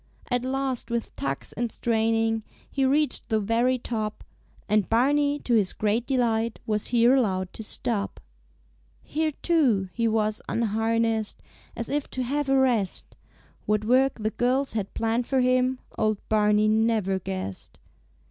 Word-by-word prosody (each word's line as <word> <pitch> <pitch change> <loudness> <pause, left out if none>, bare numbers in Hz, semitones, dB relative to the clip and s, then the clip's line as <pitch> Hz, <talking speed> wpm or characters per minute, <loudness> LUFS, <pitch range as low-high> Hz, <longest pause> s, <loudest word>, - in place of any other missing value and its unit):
At 245 0 +1
last 265 -1 -2
with 235 -1 -3
tugs 135 0 -4
and 235 0 -2
straining 225 -1 +1 0.3
He 270 -1 +1
reached 290 +3 +1
the 220 -2 +2
very 230 +5 +1
top, 215 -3 -4 0.4
And 210 -2 +2
Barney 285 +5 +3
to 245 - -1
his 205 -5 +3
great 215 +3 0
delight 230 -4 +1
Was 210 -1 0
here 240 +1 +4
allowed 190 -8 +1
to - - -7
stop. 215 -1 -3 0.8
Here, 310 0 -1
too, 250 - +2
he 230 -1 0
was 215 -1 0
unharnessed, 225 0 0 0.3
As 235 - -3
if 290 0 -2
to 255 - 0
have 280 +3 -1
a 270 - +4
rest; 240 -8 0 0.5
What 210 0 +1
work 260 +3 +3
the 215 0 -1
girls 260 +4 0
had 210 -3 -3
planned 230 +1 0
for 265 -1 +2
him 255 +1 +2 0.2
Old 215 -1 +2
Barney 210 0 +3
never 215 -3 +2
guessed. 95 - -6
230 Hz, 150 wpm, -26 LUFS, 215-255 Hz, 0.8 s, here